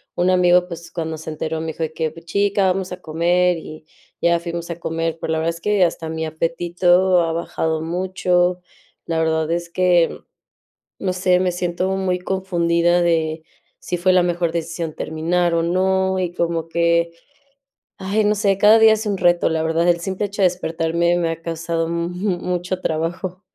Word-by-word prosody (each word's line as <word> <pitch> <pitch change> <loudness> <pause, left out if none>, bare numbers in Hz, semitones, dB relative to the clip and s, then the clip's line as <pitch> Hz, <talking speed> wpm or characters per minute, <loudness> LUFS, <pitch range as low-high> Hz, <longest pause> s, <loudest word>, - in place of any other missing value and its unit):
Un 175 +1 +2
amigo, 180 0 +4
pues, 170 -1 -9
cuando 160 -2 -4
se 160 - -8
enteró, 160 +1 -3
me 160 - -4
dijo 160 +1 -4
de 160 0 -3
que: 160 -1 -2
"Pues, 165 +1 -14
chica, 200 +2 +1
vamos 190 0 -4
a 180 0 -7
comer". 175 +2 +1
Y 155 -1 -10 0.4
ya 170 0 +3
fuimos 170 0 -5
a 170 - -5
comer, 165 -1 -2
pero 160 - -2
la 160 - 0
verdad 165 +1 -1
es 170 - -12
que 205 -1 +2
hasta 165 -1 -3
mi 160 0 -3
apetito 175 +3 +2
ha 165 -1 0
bajado 160 -1 -2
mucho. 180 +1 0 0.5
La 165 -1 -1
verdad 160 -1 0
es 170 0 -2
que, 175 -1 +2 0.8
no 185 -2 -1
sé, 180 0 +2
me 180 -1 +1
siento 180 +1 -2
muy 185 -1 0
confundida 175 -2 +1
de 160 -2 0 0.4
si 180 - -3
fue 185 +2 +3
la 180 - +5
mejor 175 -1 0
decisión 165 -1 -4
terminar 170 +2 0
o 165 - +2
no, 190 +2 +1
y 180 -2 -2
como 165 -2 -2
que, 170 0 +1 0.9
ay, 205 +3 0
no 210 +1 +3
sé, 195 -1 +1
cada 215 +2 +7
día 220 -1 +7
es 220 +1 -4
un 200 -2 -1
reto, 175 -1 +3
la 160 0 0
verdad, 165 +1 +1
el 170 -1 +3
simple 190 +3 -2
hecho 200 0 -7
de 185 - +7
despertarme 170 0 0
me 170 - 0
ha 165 0 -6
causado 165 0 -2
mu 170 0 -2 0.3
mucho 180 +1 -3
trabajo. 175 +4 -3
170 Hz, 190 wpm, -20 LUFS, 165-180 Hz, 0.9 s, cada